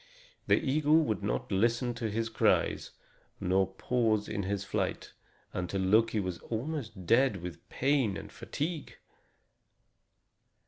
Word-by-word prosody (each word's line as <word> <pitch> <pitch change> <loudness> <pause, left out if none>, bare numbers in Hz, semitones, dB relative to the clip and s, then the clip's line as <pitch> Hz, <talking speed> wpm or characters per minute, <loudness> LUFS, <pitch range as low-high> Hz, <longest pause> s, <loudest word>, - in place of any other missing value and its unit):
The - - +6
eagle 150 +2 +2
would 110 - +1
not - - -2
listen 115 +5 +2
to 115 -2 -3
his 115 +2 -1
cries 115 - +1 0.5
nor 95 +1 +2
pause 110 0 +1
in 100 - -2
his 100 +1 -2
flight, - - -2 0.4
until 90 +2 -2
Loki 110 +3 +3
was 90 -3 -3
almost 115 - -4
dead 120 +3 +4
with 90 -1 -8
pain 130 -7 +1
and - - -9
fatigue. 155 +1 -4
110 Hz, 125 wpm, -31 LUFS, 95-130 Hz, 0.5 s, The